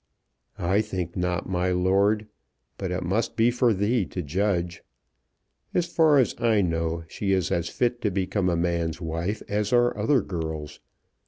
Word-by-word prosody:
"I 95 +2 +2
think 95 -5 -4
not, 90 -1 -1
my 90 0 0
lord. 100 +4 +2 0.5
But 95 - -3
it 90 +1 -2
must 100 +7 -1
be 115 +2 +4
for 120 -1 +2
thee 105 +3 +1
to 90 - -5
judge. 90 +2 -1 0.9
As 175 - +2
far 160 -3 +4
as 130 - +3
I 115 -3 +3
know 85 -2 -1
she 95 +3 -1
is 95 -3 0
as 85 0 0
fit 120 +3 -1
to 105 - +1
become 95 0 0
a 85 - +1
man's 85 -1 -1
wife 85 +5 -3
as 105 0 -1
are 120 0 +3
other 110 +3 +2
girls. 80 -5 -5
95 Hz, 165 wpm, -25 LUFS, 85-110 Hz, 0.9 s, be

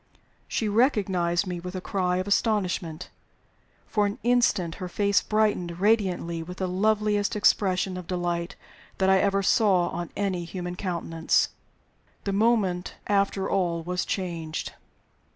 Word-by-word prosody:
She 220 - -1
recognized 200 -6 +2
me 180 -2 -4
with 180 +2 -7
a - - -2
cry 180 -1 -1
of 185 +2 -2
astonishment. 185 -6 0 0.7
For 210 -1 +1
an 200 - -4
instant 230 -8 +2
her 185 - -3
face 200 +2 +2
brightened 205 -5 0
radiantly 185 -5 +1
with 180 +3 -8
the 190 - -1
loveliest 210 +2 +1
expression 190 -3 +2
of 180 -2 -8
delight 175 0 -2 0.4
that 190 0 +3
I 190 - +5
ever 195 0 +2
saw 190 -4 +3
on 175 -1 -5
any 190 -4 -1
human 175 0 -5
countenance. 170 -3 0 0.7
The 200 - -2
moment 200 -4 +1
after, 195 -1 +1
all 175 -4 0
was 180 +1 -2
changed. 165 -4 -4
185 Hz, 135 wpm, -26 LUFS, 175-205 Hz, 0.7 s, I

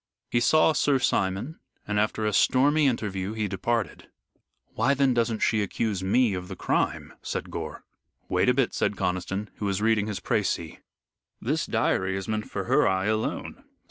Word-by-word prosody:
He 120 - +3
saw 155 +6 +4
Sir 145 -2 +2
Simon 120 - -1 0.3
and 105 0 0
after 110 +1 0
a 105 - 0
stormy 145 +7 +4
interview 105 -5 -2
he 110 -2 -1
departed. 105 +4 -2 0.6
"Why 140 +1 +2
then 135 -1 +3
doesn't 115 -2 0
she 110 - +2
accuse 100 -1 -2
me 110 +3 +3
of 90 -1 -5
the 95 - -7
crime?" - - -1
said - - -4
Gore. - - -6 0.4
"Wait - - +2
a - - +5
bit," 135 -3 +1
said - - 0
Conniston, 95 +2 -2
who 105 - -4
was 100 -1 0
reading 110 -1 +2
his 105 -3 -3
precis. - - -1 0.6
"This - - -1
diary 95 +1 0
is 95 - -5
meant 110 -1 -3
for - - -3
her - - +3
eye 95 0 +1
alone. 110 +1 -2
110 Hz, 175 wpm, -26 LUFS, 95-120 Hz, 0.6 s, a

